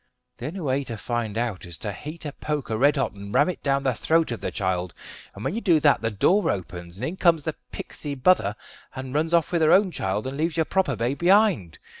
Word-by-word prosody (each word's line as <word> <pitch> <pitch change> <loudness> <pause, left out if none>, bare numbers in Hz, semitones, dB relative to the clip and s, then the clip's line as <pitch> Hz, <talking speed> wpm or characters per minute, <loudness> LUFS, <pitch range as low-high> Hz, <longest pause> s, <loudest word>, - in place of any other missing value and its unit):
The - - -4
only 185 +5 -6
way 140 -2 0
to 115 -3 -6
find 115 -1 -3
out 115 -5 -2
is 85 -2 -7
to 105 - -4
heat 155 - -8
a 145 - -3
poker 145 -6 -3
red 140 +6 +4
hot 135 - 0
and 100 0 -9
ram 150 - +4
it 180 - -5
down 140 -1 +1
the 130 -2 +2
throat 160 +6 +1
of 115 - -4
the - - -2
child; 90 -2 -2 0.4
and 100 - -7
when - - -1
you 230 - -2
do 170 -8 +4
that 145 -1 +4
the 115 - 0
door 180 - +2
opens, 90 -2 -5
and 120 - -3
in 180 - -5
comes 165 -5 +3
the 160 - -2 0.2
pixy 145 -2 -6
mother 105 - +4 0.4
and 130 0 -6
runs 155 +3 0
off 170 -2 +2
with 170 -2 +1
her 155 0 +5
own 195 -1 +5
child, 105 - -2
and 135 +1 -4
leaves 165 +2 -1
your 160 - +2
proper 190 +2 +1
babe 125 +5 -2
behind. 185 - +3
140 Hz, 245 wpm, -25 LUFS, 110-165 Hz, 0.4 s, her